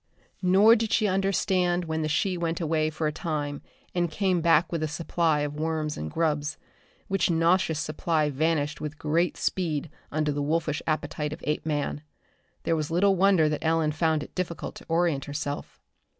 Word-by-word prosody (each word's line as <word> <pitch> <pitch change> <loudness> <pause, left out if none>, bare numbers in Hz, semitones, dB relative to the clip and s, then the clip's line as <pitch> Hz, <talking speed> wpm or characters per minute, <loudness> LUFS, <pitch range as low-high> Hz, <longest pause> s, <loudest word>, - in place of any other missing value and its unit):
Nor 195 +5 +6
did 225 -1 -1
she 220 - +3
understand 185 -2 +1
when 160 0 -2
the 155 - 0
she 180 +5 +1
went 170 -1 -2
away 155 -2 +1
for 155 +1 -3
a 150 - +1
time 150 -3 -3 0.3
and 175 -1 +1
came 185 +1 +1
back 165 0 +4
with 165 -2 -2
a 155 - 0
supply 160 0 0
of 145 0 -2
worms 155 -1 -1
and 75 - -5
grubs 150 - -1 0.5
which 195 -1 +1
nauseous 165 -1 +2
supply 155 0 0
vanished 150 +1 0
with 150 0 -5
great 165 +4 0
speed 160 -4 -1 0.2
under 155 0 0
the 145 0 -2
wolfish 150 0 0
appetite 150 -1 -2
of 160 - -10
Apeman. 150 -1 -1 0.6
There 165 - +1
was 155 -2 -2
little 190 +4 +3
wonder 190 -4 +4
that 150 0 -2
Ellen 160 -1 +2
found 155 -1 +1
it - - -12
difficult 180 -2 -4
to - - -13
orient 165 -4 +1
herself. 145 0 -5
160 Hz, 175 wpm, -27 LUFS, 150-175 Hz, 0.6 s, Nor